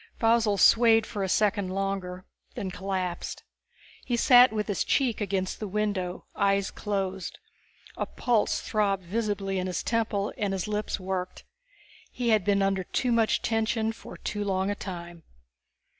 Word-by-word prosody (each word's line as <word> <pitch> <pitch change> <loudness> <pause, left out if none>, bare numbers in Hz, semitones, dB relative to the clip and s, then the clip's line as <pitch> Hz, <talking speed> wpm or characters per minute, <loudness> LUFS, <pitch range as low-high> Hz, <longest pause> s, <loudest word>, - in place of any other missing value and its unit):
Faussel 225 -3 +3
swayed 225 +2 +6
for 205 - -5
a 190 - -1
second 205 -1 +1
longer, 190 -1 -3 0.3
then 190 - -4
collapsed. 185 -2 -4 0.6
He 240 -2 -1
sat 245 0 +7
with 215 -1 -2
his 205 -4 0
cheek 250 -6 +1
against 190 -2 -2
the 215 - -4
window, 195 -3 -2
eyes 200 -1 +1
closed. 195 -3 -3 0.6
A - - -2
pulse 235 -4 0
throbbed 200 -3 0
visibly 195 0 -2
in 185 - -2
his 180 - -2
temple 220 -3 -1
and 205 -2 0
his 190 0 -2
lips 210 -1 -2
worked. 185 -1 -4 0.7
He 245 -2 -2
had 215 -3 +4
been 200 0 +2
under 195 -1 +1
too 250 +7 -1
much 230 -2 +2
tension 225 0 0
for 225 - -11
too 205 -1 -3
long 190 0 0
a - - -2
time. 175 -3 -7
200 Hz, 155 wpm, -27 LUFS, 190-220 Hz, 0.7 s, sat